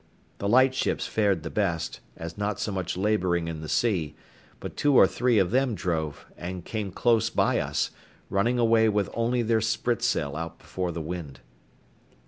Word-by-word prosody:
The 100 - -1
light 130 +3 +5
ships - - -1
fared 100 -7 +1
the - - -5
best, 85 -6 -1 0.2
as 80 0 -6
not 105 0 -2
so 105 - -2
much 95 -2 -3
labouring 90 -4 +1
in 80 -1 -5
the 80 - -7
sea; 85 -10 0 0.4
but - - -7
two 145 -2 +2
or - - +9
three 125 -2 +1
of 95 -2 +3
them 130 -2 +2
drove, 80 -6 -3
and 90 0 -6
came 110 -3 -3
close 115 +2 +2
by - - +2
us, - - -1 0.4
running 115 +6 +1
away 115 -1 +4
with 105 -2 0
only 120 +1 +1
their 110 0 +2
spritsail 110 - 0
out 80 +1 -5
before 90 -1 -4
the 85 -1 -4
wind. 80 -4 -6
100 Hz, 175 wpm, -27 LUFS, 85-115 Hz, 0.4 s, or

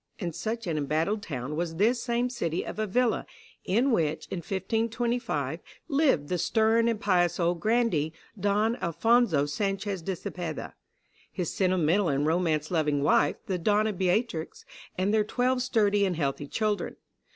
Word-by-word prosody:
And 175 -5 -4
such 225 +6 -3
an 160 -3 -1
embattled 160 +9 0
town 140 -4 -5
was 165 0 -2
this 230 +7 +2
same 240 0 0
city 170 -9 -2
of - - -6
Avila, 225 +3 +1 0.4
in 240 +8 +2
which, 160 -7 0
in - - -2
1525, 220 - -1 0.3
lived 275 - +2
the 180 +2 -1
stern 225 +3 +3
and 230 -2 0
pious 175 -4 +2
old 170 0 +1
grandee, 215 -9 +1 0.3
Don 210 +4 +1
Alphonso 170 -2 +2
Sanchez 195 +4 -2
de 190 +3 -3
Cepeda, 170 -2 -5 0.6
his 175 -3 -3
sentimental 185 0 +2
and 140 +1 +1
romance 160 -2 +1
loving 150 -4 +1
wife, 145 0 +3
the 185 -2 -2
Donna 210 +4 +2
Beatrix, 185 -2 -1 0.3
and 190 +3 +1
their 215 -1 +4
twelve 250 +4 0
sturdy 210 -5 +2
and 185 -3 +1
healthy 145 -2 -2
children. 210 +4 -1
190 Hz, 150 wpm, -28 LUFS, 160-225 Hz, 0.6 s, their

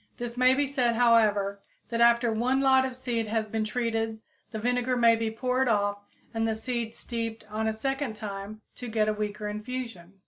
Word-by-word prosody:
This 240 0 -5
may 255 +1 +5
be 285 +1 +2
said, 255 -4 +1
however, 215 -4 +3 0.3
that 235 0 -1
after 235 0 +5
one 245 +4 +1
lot 265 -1 +5
of 260 -1 -4
seed 240 -3 -2
has 220 0 -1
been 220 +1 -1
treated 225 -1 -1 0.3
the 220 - -5
vinegar 245 +2 0
may 230 -1 +6
be 225 0 -1
poured 255 +3 0
off 205 -2 +1 0.3
and 225 0 0
the 220 - 0
seeds 230 0 -4
steeped 230 -2 -5
a 220 +1 0
second 270 +1 -2
time 210 0 -7 0.2
to 245 - -6
get 220 -1 +1
a 215 - +2
weaker 210 0 -3
infusion. 210 -4 -6
230 Hz, 185 wpm, -28 LUFS, 215-250 Hz, 0.3 s, may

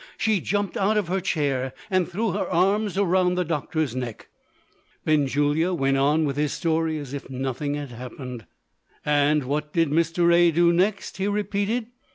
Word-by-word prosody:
She 215 -4 +1
jumped 205 +2 -1
out 210 +2 +2
of 200 -5 0
her 190 +1 +1
chair, 135 -7 -1 0.2
and 185 -2 +2
threw 210 +4 -1
her 200 - -2
arms 195 +3 +1
round 180 -2 +2
the 180 - +1
doctor's 155 -4 -2
neck. 125 -4 -5 0.8
Benjulia 145 +3 +2
went 135 -3 +1
on 150 +3 +3
with 140 -1 -2
his 150 -1 0
story 160 -1 0
as 145 -3 -7
if 140 - -6
nothing 135 +2 -3
had 145 -3 -6
happened. 125 - -8 0.6
"And 150 0 +3
what 150 +3 -3
did 165 -3 +2
Mr. 170 +2 +3
A. 175 0 +6
do 170 +1 +3
next?" 190 +3 0
he 190 +1 -1
repeated. 205 +3 -1
160 Hz, 170 wpm, -24 LUFS, 145-185 Hz, 0.8 s, A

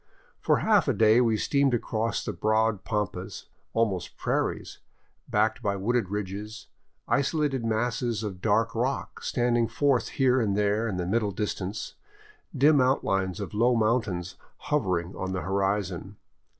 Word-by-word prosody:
For - - +2
half 210 -6 +4
a 135 - +3
day 110 +3 +5
we 115 -3 +2
steamed 140 +1 +2
across 115 -1 -2
broad 110 -1 0
pampas, 105 -4 -3 0.3
almost 105 -6 -1
prairies, - - -2 0.5
backed 110 +1 +1
by 100 -1 0
wooded 105 +1 0
ridges, 105 +2 -5 0.4
isolated 140 -2 0
masses 115 0 -1
of 95 -4 -5
dark 115 +2 +2
rock 125 +4 -2
standing 120 -1 +1
forth 125 +1 +1
here 130 -1 +3
and 100 -3 0
there 105 +2 +1
in 100 -5 -3
the 90 - -2
middle 105 +3 +1
distance, 100 +1 -4 0.6
dim 145 +1 +5
outlines 95 -8 +1
of 100 - -6
low 120 +4 +3
mountains 110 -6 0 0.2
hovering 95 - -1
on 95 0 -4
the 95 - -2
horizon. 95 +1 -2
110 Hz, 135 wpm, -27 LUFS, 100-120 Hz, 0.6 s, day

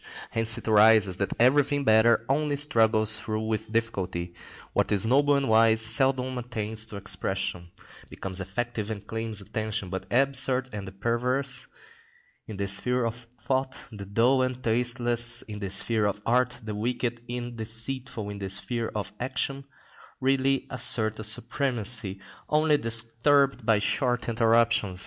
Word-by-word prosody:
Hence 115 0 +3
it - - -9
arises 105 -3 +5
that 100 - -2
everything 145 +3 +3
better 115 0 +4
only 145 +2 0
struggles 110 -6 +3
through 110 0 -3
with 110 0 -3
difficulty; 95 -6 -2 0.4
what - - 0
is 105 +1 +4
noble 140 +4 +3
and 140 -1 0
wise 110 0 +4
seldom 130 +3 +1
attains 110 -2 -2
to 110 - -9
expression, 95 -2 -3 0.4
becomes 95 0 -5
effective 110 +3 -4
and 105 -2 -6
claims 110 -1 -4
attention, 110 -1 -4
but 95 0 -6
the 125 +3 +4
absurd 130 -1 0
and 100 -2 -6
the - - -7
perverse 125 +6 -1 0.8
in 105 - -7
the 100 - -2
sphere 120 +6 +1
of 120 +1 -5
thought, 130 +2 -2
the 100 -3 -9
dull 120 +6 +2
and 130 0 -2
tasteless 120 0 +2
in 105 -1 -8
the 100 -2 -4
sphere 105 +3 +3
of 100 0 -3
art, 125 0 +1
the 110 -1 -5
wicked 120 +2 -3
and 120 0 -5
deceitful 110 0 -4
in 100 - -8
the 95 -1 -5
sphere 115 +4 -3
of 100 -1 -4
action, 135 +2 -3 0.5
really 135 0 +1
assert 110 -4 -1
a - - -5
supremacy, 110 -2 0 0.3
only 155 0 +3
disturbed 120 +3 +2
by 110 -2 +4
short 120 +2 -1
interruptions. 115 -4 +2
115 Hz, 150 wpm, -26 LUFS, 105-125 Hz, 0.8 s, arises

